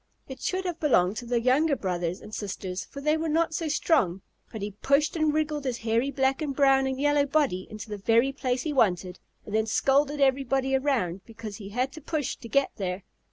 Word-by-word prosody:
It 265 -1 -9
should 375 0 -1
have 350 -2 -3
belonged 210 - +3
to 240 - -6
the 240 0 +1
younger 275 +5 +3
brothers 180 -4 -3
and 215 - -12
sisters, 190 -3 -4
for 280 - -9
they 305 +2 +2
were 320 0 -2
not 320 +1 +1
so 325 0 -2
strong, 250 - +1 0.3
but 220 -3 -6
he 205 - -3
pushed 285 +4 +2
and 310 -2 +2
wriggled 300 -1 -1
his 255 -3 -2
hairy 230 +4 0
black 270 +1 0
and 285 -3 -2
brown 270 -1 +4
and 265 0 -3
yellow 290 0 +3
body 275 -11 +1
into 215 +1 -8
the 210 -1 -6
very 230 +6 +3
place 255 -2 -2
he 310 - -2
wanted, 185 -7 +1 0.3
and 210 - -8
then 220 0 +1
scolded 280 +5 +2
everybody 270 0 +2
around 250 -10 0
because 220 -3 -8
he 200 -2 -9
had 250 +5 -1
to 315 - -10
push 300 -2 -2
to 230 - -11
get 275 +4 +2
there. 185 -1 -3
265 Hz, 215 wpm, -27 LUFS, 215-290 Hz, 0.3 s, brown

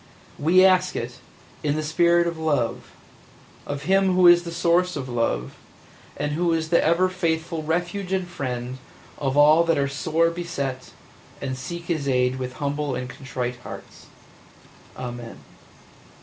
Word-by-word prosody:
We 180 +5 +5
ask 185 -1 +3
it, 120 +1 -5 0.4
in 145 -1 0
the 155 - -2
spirit 170 +2 +3
of 170 0 -2
love, 145 -7 -1 0.7
of 145 0 -4
Him 190 +1 +3
Who 185 0 +5
is 175 0 +8
the 170 -1 -7
Source 175 +2 +2
of 135 -3 -4
Love, 115 - -1 0.6
and 145 +1 -2
Who 170 +2 +1
is 160 -1 -1
the 170 - +4
ever 170 +3 +3
faithful 165 -3 -2
refuge 175 +4 -2
and 190 -2 0
friend 130 -5 -5 0.4
of 135 0 -1
all 155 +3 +6
that 165 -1 +2
are 140 0 +1
sore 160 +4 +1
beset 140 -7 -4 0.5
and 130 -2 -3
seek 170 +7 -6
His 160 -5 -2
aid 125 -1 +2
with 125 -1 -4
humble 145 0 -2
and 125 - -4
contrite 125 -1 -5
hearts. - - -11 0.9
Amen. 120 -2 -7
155 Hz, 150 wpm, -24 LUFS, 130-170 Hz, 0.9 s, is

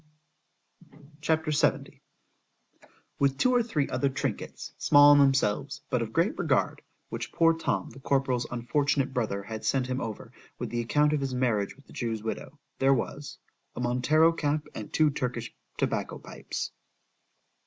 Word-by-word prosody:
C - - -34 1.2
H - - -5
A 160 - +5
P. 160 -1 -4
LXVII 145 - 0 1.2
WITH 135 -1 +2
two 255 - +3
or 245 - +4
three 170 -12 -1
other 130 +2 0
trinkets, 135 +2 -4
small 145 0 +7
in 145 - +6
themselves, 135 +1 +2
but 125 - +1
of 115 -1 -3
great 175 - +1
regard, - - +1 0.3
which - - -5
poor 165 0 +4
Tom, 165 - -2
the 135 - -12
corporal's 135 -3 0
unfortunate 140 +3 0
brother, 110 -6 -1
had 110 +1 -7
sent 135 -2 +1
him 130 +2 -2
over, 110 -2 -6 0.3
with - - -5
the 120 0 -1
account 150 +5 +2
of 150 - 0
his 135 -2 -2
marriage 115 -6 0
with 140 - -20
the - - -16
Jew's 115 -3 -3
widow——there 135 +3 -1
was 145 +3 -5 0.4
A - - -6
Montero 125 +7 +3
cap 150 -1 -1
and 105 - -7
two 155 -2 +3
Turkish 120 -3 -3 0.2
tobacco - - -1
pipes. - - -6
135 Hz, 165 wpm, -28 LUFS, 120-150 Hz, 1.2 s, small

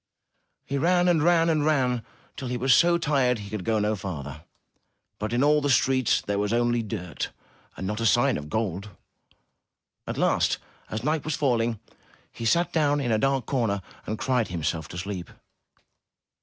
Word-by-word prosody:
He 140 0 -2
ran 175 +3 +3
and 170 -3 +3
ran 165 0 +4
and 155 -3 +2
ran 130 -6 +1 0.3
till 130 - -5
he 125 0 -2
was 130 +1 +3
so 170 +7 +5
tired 135 -7 +1
he 100 -1 -9
could 105 -4 -4
go 110 +2 +1
no 105 +1 +1
farther, 80 -5 -7 0.7
but 105 +2 -3
in 120 +3 +2
all 150 +1 +4
the 145 - 0
streets 130 -1 +3
there 100 0 -2
was 105 0 0
only 120 0 +2
dirt 95 -8 -5 0.5
and 95 - -5
not 105 +3 -3
a 115 - +3
sign - - +3
of 75 +1 -6
gold. 100 -1 -2 1.2
At - - -4
last, - - +2 0.3
as 110 +2 -4
night 155 +1 0
was 155 -1 -2
falling, 120 -5 +1 0.5
he 115 - -7
sat 170 +9 +2
down 145 -3 +2
in 125 -4 -1
a 110 - +2
dark 135 -1 +1
corner, 110 -8 -1 0.2
and 110 - -2
cried 125 -3 0
himself 80 -2 -3
to 85 - -9
sleep. 90 -2 -5
120 Hz, 180 wpm, -26 LUFS, 105-145 Hz, 1.2 s, so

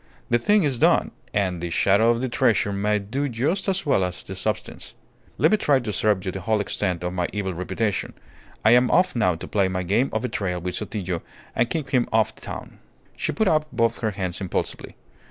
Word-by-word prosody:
"The 120 - +4
thing 205 - +3
is 135 -5 0
done, - - +3 0.2
and 95 -4 0
the 85 - -3
shadow 100 +6 +3
of 120 0 +2
the 130 - 0
treasure 110 -4 +2
may 105 +2 +1
do 130 +8 -2
just 145 - -1
as 190 -1 0
well 120 -10 +3
as 90 0 -3
the 95 - -7
substance. 95 +2 -4 0.4
Let - - +4
me 215 - +5
try 145 -9 +3
to 110 -4 -4
serve 105 -3 +1
you 95 - -1
to 95 - -5
the - - -10
whole 110 +1 +1
extent 90 -3 -2
of 90 0 -2
my 90 -1 0
evil 100 -2 -2
reputation. 95 +3 -2 0.5
I 110 - +7
am 125 +1 +5
off 185 - +3
now 90 -7 +2
to 80 - -8
play 100 -2 +2
my 95 0 -2
game 120 +9 +1
of 110 - -2
betrayal 95 -7 -2
with 90 +1 -4
Sotillo, 90 -2 -3 0.3
and 120 - +2
keep 150 -5 -3
him 125 -3 +2
off 110 -1 +2
the - - -20
town." - - -8 0.4
She - - -1
put 220 -2 +1
out 155 -3 +2
both 115 0 +1
her 110 - 0
hands 95 -2 -4
impulsively. 95 - -3
105 Hz, 225 wpm, -24 LUFS, 95-125 Hz, 0.5 s, I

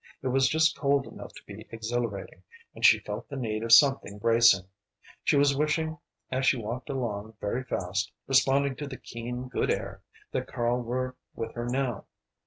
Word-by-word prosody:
It 130 - 0
was 135 +1 +3
just 160 +2 +3
cold 140 -1 +1
enough - - -10
to - - -13
be 105 +2 -10
exhilarating, 110 -4 -4 0.3
and - - -11
she - - +8
felt 105 +2 -6
the 140 - -6
need 110 -5 -2
of 115 0 -3
something 135 -4 +6
bracing. 115 -3 +5 0.6
She - - +3
was 140 0 +4
wishing 155 +2 0 0.3
as 130 +1 0
she - - +4
walked 120 +4 -5
along 110 -5 -3
very 120 +5 -2
fast, 100 -4 -2
responding 135 +1 +3
to 145 - -5
the 130 -2 -7
keen, 125 +2 -6
good 125 - -1
air, - - -2 0.3
that - - -2
Karl 120 +1 0
were 130 +2 -3 0.2
with 115 -1 -5
her 120 0 -4
now. 125 -4 -1
125 Hz, 180 wpm, -28 LUFS, 110-135 Hz, 0.6 s, she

